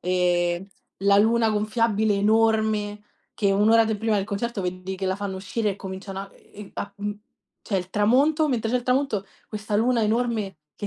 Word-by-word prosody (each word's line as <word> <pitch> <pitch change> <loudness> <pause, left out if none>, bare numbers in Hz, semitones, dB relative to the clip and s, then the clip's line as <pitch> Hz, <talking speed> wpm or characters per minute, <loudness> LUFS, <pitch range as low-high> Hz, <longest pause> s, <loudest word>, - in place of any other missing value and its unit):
e 175 0 +1 0.3
la 200 +1 +4
luna 225 +1 +3
gonfiabile 215 0 +1
enorme, 215 0 +1 0.3
che 200 -2 +1
1 210 +3 +3
ora 225 0 +6
de 220 -1 -1
prima 220 0 0
del 195 - 0
concerto 210 +1 -3
vedi 185 +1 -4
che 190 0 -3
la 190 +1 0
fanno 200 -2 -4
uscire 205 +3 -2
e 195 - -5
cominciano 190 0 -7
a 195 - -8
ehm, 205 -1 -13
a 200 0 -5
mhmm, 205 0 -3 0.5
c'è 200 - -2
il 185 0 -4
tramonto 280 - +3
mentre 230 -4 -1
c'è 250 - +2
il 245 - -2
tramonto, 250 -6 0 0.2
questa 210 -1 -3
luna 235 +1 +2
enorme 215 -4 -1 0.2
che 205 - -5
210 Hz, 190 wpm, -24 LUFS, 195-225 Hz, 0.5 s, ora